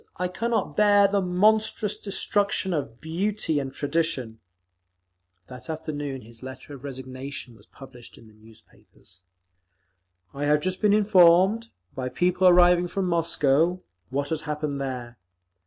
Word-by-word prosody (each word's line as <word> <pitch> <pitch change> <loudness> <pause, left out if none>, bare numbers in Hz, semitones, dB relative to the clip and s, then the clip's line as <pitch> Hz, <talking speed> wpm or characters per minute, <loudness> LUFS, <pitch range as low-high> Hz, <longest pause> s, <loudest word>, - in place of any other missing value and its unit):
I 180 0 -2
cannot 230 +5 -2
bear 205 -1 +5
the 200 0 0
monstrous 210 +3 +2
destruction 200 -1 -1
of 130 -7 -4
beauty 170 -1 -1
and 135 -1 -5
tradition…." 140 -6 -2 1.1
That 125 - -11
afternoon 145 -4 -5
his 115 0 -14
letter 130 +2 -10
of 135 -2 -11
resignation 130 -2 -8
was 105 0 -20
published 130 -3 -14
in - - -16
the 110 - -19
newspapers: 110 -4 -20 1.1
I 145 +1 -3
have 150 0 +3
just 185 +2 -3
been 210 -1 +4
informed, 195 +1 +4 0.3
by 130 -1 -4
people 180 +6 +2
arriving 175 0 +5
from 195 +2 -2
Moscow, 165 0 +1 0.3
what 140 +2 -2
has 160 -2 -2
happened 150 -2 -4
there. 125 -3 -6
160 Hz, 135 wpm, -25 LUFS, 130-185 Hz, 1.1 s, bear